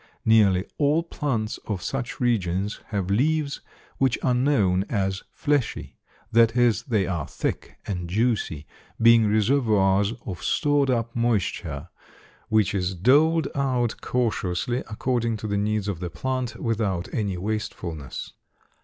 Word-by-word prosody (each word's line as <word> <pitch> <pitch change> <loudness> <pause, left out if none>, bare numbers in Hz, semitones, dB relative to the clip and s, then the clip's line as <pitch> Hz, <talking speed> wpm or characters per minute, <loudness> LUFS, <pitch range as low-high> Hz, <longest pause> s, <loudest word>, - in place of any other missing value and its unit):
Nearly 100 -4 +4
all 150 +3 +3
plants 125 -10 -2
of 100 -5 -3
such 130 -3 -4
regions 100 -4 0
have 100 -3 -2
leaves 145 +6 +1 0.4
which 135 -1 +2
are 125 - +3
known 125 -8 +2
as 95 -3 -1
fleshy, 145 -4 -1 0.3
that 115 0 +4
is, 120 -5 +3
they 110 -6 0
are 85 -4 -3
thick - - -4
and 90 -3 -4
juicy, 105 -7 0 0.3
being 115 -1 +6
reservoirs 105 -3 +2
of 90 -3 -6
stored 145 -3 +2
up 115 -2 -1
moisture 100 -9 -1 0.6
which 110 -4 +2
is 95 -1 -1
doled 145 - +4
out 125 -4 0
cautiously 120 -1 -1
according 115 0 -1
to 110 - -7
the 100 -1 -1
needs 105 0 -1
of 100 -5 -3
the 90 -1 -4
plant, 130 +8 -3
without 105 -6 -1
any 100 -5 -1
wastefulness. 90 -7 -5
110 Hz, 130 wpm, -25 LUFS, 95-125 Hz, 0.6 s, being